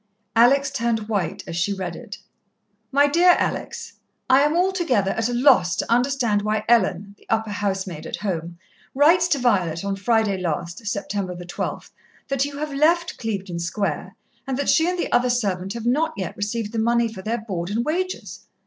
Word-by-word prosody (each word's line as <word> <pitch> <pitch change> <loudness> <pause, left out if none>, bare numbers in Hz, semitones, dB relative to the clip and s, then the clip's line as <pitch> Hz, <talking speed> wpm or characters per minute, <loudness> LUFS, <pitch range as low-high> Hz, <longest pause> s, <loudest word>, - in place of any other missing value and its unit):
Alex 270 +4 +4
turned 235 -4 -1
white 195 -3 -2
as 165 - -6
she 175 +4 0
read 185 -4 -4
it. 205 - -9 0.7
"MY 285 +1 +5
DEAR 345 +5 +5
ALEX, - - -3 0.4
"I 265 +1 +7
am 295 +2 +2
altogether 345 - +1
at 225 +1 -1
a - - -2
loss 245 - +4
to - - -3
understand 245 -4 +2
why 215 0 -1
Ellen 200 -4 +2
(the - - -24
upper 220 -1 0
housemaid 190 -5 -3
at - - -3
home) 170 -4 -4 0.4
writes 335 +5 +5
to 300 - +2
Violet 190 -9 +1
on 200 0 -1
Friday 210 -1 +1
last, 170 0 -3
Sept. 200 -2 -3 0.4
12, - - -5 0.4
that 275 0 +1
you 285 0 -7
have 300 0 -4
left 335 +4 +2
Clevedon 195 -6 -4
Square, 170 +5 -3 0.3
and 265 -1 -2
that 285 - -1
she 320 +2 +3
and 360 - -2
the - - -2
other 245 +1 +3
servant 195 -6 -1
have 230 -1 -6
not 310 +6 +1
yet 190 - -4
received 210 +1 -3
the 225 - -2
money 235 +1 +2
for 190 - -8
their 225 +4 -2
board 190 -6 -4
and 230 +4 -1
wages. 370 +4 -3
225 Hz, 185 wpm, -23 LUFS, 195-275 Hz, 0.7 s, I